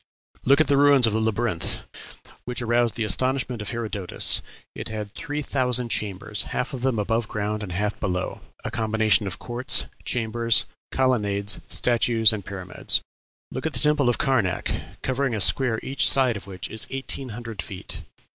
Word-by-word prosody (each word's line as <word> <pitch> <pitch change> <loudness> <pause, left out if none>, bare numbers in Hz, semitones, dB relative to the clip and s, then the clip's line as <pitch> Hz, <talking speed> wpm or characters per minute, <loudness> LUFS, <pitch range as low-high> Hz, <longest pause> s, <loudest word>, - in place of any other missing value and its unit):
Look 140 +3 +5
at 155 - +4
the 140 - +3
ruins 140 -3 +6
of 110 - +1
the 110 - +1
Labyrinth, 110 -5 -1 0.7
which 125 0 -4
aroused 120 -1 +1
the 115 - -1
astonishment 130 +2 0
of 105 - -5
Herodotus; 110 -6 +1 0.3
it - - -6
had 105 -1 -5
three 150 +3 -4
thousand 125 -3 +1
chambers, 105 0 -2
half 130 +3 -3
of 130 - -5
them 130 -2 +1
above 115 +2 0
ground 105 0 -2
and 100 -3 -5
half 100 +4 -2
below 90 -3 -2 0.2
a - - -4
combination 110 -1 +2
of 90 - -5
courts, 120 +1 +1 0.2
chambers, 115 0 +2 0.3
colonnades, 105 -6 0
statues, 115 -2 +3
and 105 -2 -4
pyramids. 95 -2 -1 0.5
Look 130 - -3
at 160 - -4
the 125 - +2
Temple 150 -4 +3
of 120 - +1
Karnac, 115 -10 0 0.3
covering 130 -1 0
a - - -2
square 110 +3 +3
each 135 +1 +4
side 130 -4 +5
of 100 - -8
which 95 -2 -5
is 110 0 -2
eighteen 135 0 -4
hundred 115 -1 -6
feet. 95 -3 -7
115 Hz, 170 wpm, -24 LUFS, 105-130 Hz, 0.7 s, ruins